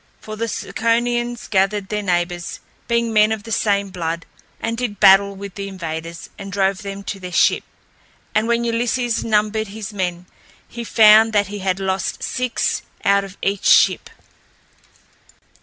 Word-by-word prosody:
For 215 Hz, -, -8 dB
the 230 Hz, +2 st, -2 dB
Ciconians 240 Hz, +1 st, -1 dB
gathered 195 Hz, 0 st, 0 dB
their 210 Hz, -1 st, -2 dB
neighbors, 175 Hz, -2 st, -2 dB, 0.3 s
being 235 Hz, -1 st, 0 dB
men 215 Hz, 0 st, +4 dB
of 220 Hz, -2 st, -3 dB
the 225 Hz, -, -9 dB
same 200 Hz, -2 st, +1 dB
blood, 165 Hz, -2 st, -4 dB, 0.3 s
and 230 Hz, 0 st, -2 dB
did 230 Hz, -4 st, -4 dB
battle 200 Hz, +1 st, +6 dB
with 200 Hz, 0 st, -8 dB
the 200 Hz, +1 st, -6 dB
invaders 165 Hz, -3 st, -6 dB
and 195 Hz, 0 st, -7 dB
drove 195 Hz, 0 st, +1 dB
them 200 Hz, 0 st, -7 dB
to 195 Hz, -, -5 dB
their 180 Hz, -1 st, -7 dB
ship. -, -, +3 dB, 0.7 s
And 215 Hz, +1 st, +1 dB
when 235 Hz, 0 st, +1 dB
Ulysses 235 Hz, 0 st, 0 dB
numbered 215 Hz, 0 st, +1 dB
his 210 Hz, +1 st, -7 dB
men, 180 Hz, -3 st, -3 dB, 0.4 s
he 235 Hz, -, -7 dB
found 220 Hz, 0 st, +6 dB
that 205 Hz, -2 st, +2 dB
he 205 Hz, 0 st, -6 dB
had 190 Hz, 0 st, -1 dB
lost 190 Hz, -1 st, -2 dB
six 250 Hz, -1 st, -1 dB, 0.2 s
out 200 Hz, 0 st, +4 dB
of 195 Hz, 0 st, -10 dB
each 200 Hz, 0 st, -1 dB
ship. -, -, +4 dB
205 Hz, 155 wpm, -20 LUFS, 190-225 Hz, 0.7 s, battle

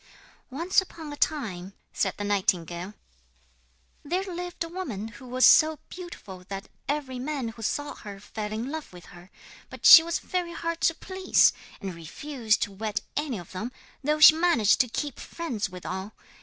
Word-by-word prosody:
'Once 335 Hz, +9 st, +2 dB
upon 320 Hz, -5 st, -9 dB
a -, -, -6 dB
time,' 200 Hz, -, -2 dB, 0.2 s
said -, -, 0 dB
the 205 Hz, -, -4 dB
nightingale, 185 Hz, -2 st, -1 dB, 1.1 s
'there 355 Hz, +6 st, -1 dB
lived 355 Hz, -2 st, -5 dB
a -, -, -6 dB
woman 265 Hz, -, -5 dB
who 230 Hz, +4 st, -13 dB
was 255 Hz, +1 st, +3 dB
so 310 Hz, 0 st, +6 dB
beautiful 275 Hz, -, -9 dB
that 195 Hz, 0 st, -6 dB, 0.2 s
every 275 Hz, -3 st, -2 dB
man 270 Hz, -3 st, -3 dB
who 225 Hz, 0 st, -11 dB
saw 290 Hz, +6 st, -2 dB
her 200 Hz, -2 st, -10 dB
fell 210 Hz, +1 st, -6 dB
in 230 Hz, +5 st, -3 dB
love 315 Hz, -1 st, -6 dB
with 180 Hz, -1 st, -13 dB
her. 175 Hz, +1 st, -14 dB, 0.4 s
But -, -, -9 dB
she 325 Hz, -, +12 dB
was 335 Hz, +1 st, -2 dB
very 355 Hz, -2 st, -3 dB
hard 335 Hz, -1 st, -3 dB
to 330 Hz, -, -7 dB
please, 375 Hz, +2 st, +3 dB, 0.3 s
and 195 Hz, -3 st, -5 dB
refused 220 Hz, -, -1 dB
to 205 Hz, -, -4 dB
wed 210 Hz, +1 st, -3 dB
any 290 Hz, -6 st, -1 dB
of 175 Hz, -3 st, -10 dB
them, 215 Hz, +7 st, -5 dB, 0.3 s
though 300 Hz, +2 st, +1 dB
she 310 Hz, 0 st, +10 dB
managed 320 Hz, -, +3 dB
to 255 Hz, -, 0 dB
keep 285 Hz, +3 st, -4 dB
friends 245 Hz, -, -4 dB
with 180 Hz, -1 st, -10 dB
all. 190 Hz, +3 st, -5 dB
255 Hz, 175 wpm, -27 LUFS, 205-315 Hz, 1.1 s, she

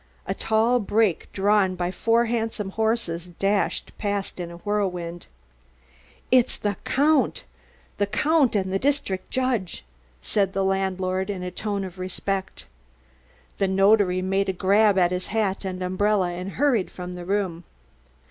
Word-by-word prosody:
A -, -, -1 dB
tall 225 Hz, +3 st, +2 dB
brake 210 Hz, -3 st, +1 dB
drawn 195 Hz, -1 st, +2 dB
by 175 Hz, 0 st, -2 dB
four 230 Hz, +4 st, +2 dB
handsome 225 Hz, -3 st, -2 dB
horses 220 Hz, -6 st, -1 dB
dashed 195 Hz, +3 st, -1 dB
past 200 Hz, -2 st, -2 dB
in 175 Hz, -1 st, -4 dB
a 170 Hz, -, -9 dB
whirlwind. 180 Hz, -3 st, -3 dB, 1.0 s
"It's 255 Hz, -1 st, +4 dB
the 205 Hz, -1 st, -1 dB
Count 295 Hz, +3 st, +2 dB, 0.6 s
the 205 Hz, -, +2 dB
Count 290 Hz, +2 st, +2 dB
and 190 Hz, -2 st, 0 dB
the 195 Hz, -, +1 dB
district 265 Hz, -9 st, -1 dB
judge," 245 Hz, -, -1 dB, 0.3 s
said 195 Hz, -, 0 dB
the 195 Hz, -, 0 dB
landlord 190 Hz, 0 st, -1 dB
in 190 Hz, -3 st, -3 dB
a 180 Hz, -, -4 dB
tone 200 Hz, +1 st, -3 dB
of 185 Hz, -1 st, -8 dB
respect. 190 Hz, +1 st, -4 dB, 0.9 s
The 195 Hz, -, +2 dB
notary 195 Hz, -1 st, +3 dB
made 195 Hz, +1 st, 0 dB
a -, -, 0 dB
grab 200 Hz, +2 st, +3 dB
at 175 Hz, -1 st, +4 dB
his 180 Hz, 0 st, -3 dB
hat 205 Hz, -3 st, -1 dB
and 185 Hz, -1 st, -4 dB
umbrella 185 Hz, 0 st, +1 dB
and 180 Hz, +2 st, -6 dB
hurried 255 Hz, -9 st, +2 dB
from 180 Hz, 0 st, -7 dB
the 180 Hz, 0 st, -7 dB
room. 185 Hz, -3 st, -1 dB
195 Hz, 150 wpm, -24 LUFS, 185-215 Hz, 1.0 s, It's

